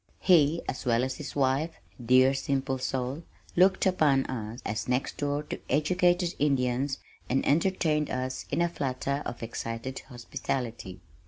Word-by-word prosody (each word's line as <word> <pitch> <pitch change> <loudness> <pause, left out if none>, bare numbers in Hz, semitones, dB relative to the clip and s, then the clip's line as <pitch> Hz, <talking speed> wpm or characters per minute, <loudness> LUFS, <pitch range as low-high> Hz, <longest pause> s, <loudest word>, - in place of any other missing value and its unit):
He, 165 -3 +4
as 130 - -4
well 120 0 +2
as 130 0 -2
his 150 - -7
wife 140 +4 +1 0.2
(dear 130 +3 +5
simple 135 -1 -1
soul), 130 +3 -2 0.3
looked 190 +2 +4
upon 150 -8 +3
us 115 -1 -5
as 110 +1 -2
next 125 +2 -1
door 145 0 -1
to - - -6
educated 175 +4 +2
Indians 135 -1 +1 0.3
and 135 +2 +1
entertained 155 -1 +2
us 130 0 -3
in 170 - +1
a - - +3
flutter 140 -3 -2
of 120 0 -6
excited 115 +3 -4
hospitality. 120 -4 -4
135 Hz, 145 wpm, -28 LUFS, 125-150 Hz, 0.3 s, dear